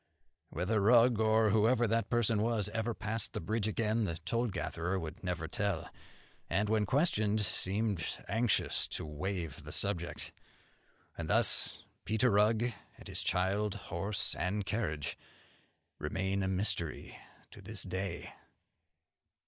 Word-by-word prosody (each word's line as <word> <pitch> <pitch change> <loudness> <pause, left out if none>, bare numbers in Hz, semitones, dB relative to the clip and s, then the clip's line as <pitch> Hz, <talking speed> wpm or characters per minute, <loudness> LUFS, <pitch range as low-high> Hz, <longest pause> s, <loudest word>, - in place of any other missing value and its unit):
Whether 95 +6 0
Rugg, 115 +2 +5
or 110 -1 +4
whoever 115 +3 +4
the 115 +1 +2
person 115 -3 +1
was, 110 -2 +1
ever 115 +1 -2
passed 110 0 -2
the - - -2
bridge 110 +5 -1
again, 110 0 0
the 85 -3 -3
toll 115 +8 -1
gatherer 90 -2 -2
would 80 -1 -6
never 90 -3 -2
tell; 95 +1 -2 0.6
and 105 +4 +1
when 105 -2 +2
questioned, 110 - +2
seemed 100 -1 0
anxious 110 0 +1
to - - -4
waive 85 +1 -4
the - - -8
subject. 85 -4 -1 0.8
And - - -5
thus - - +4 0.2
Peter 110 +3 +2
Rugg 105 +3 +4 0.3
and - - -12
his - - -2
child, 100 +3 0
horse 100 +1 -1
and 100 +3 -1
carriage, 75 -9 -2 0.8
remain 95 +5 -1
a 95 - 0
mystery 95 -4 -1 0.4
to 105 - -12
this 105 0 -3
day." 95 +1 -4
105 Hz, 130 wpm, -33 LUFS, 95-110 Hz, 0.8 s, Rugg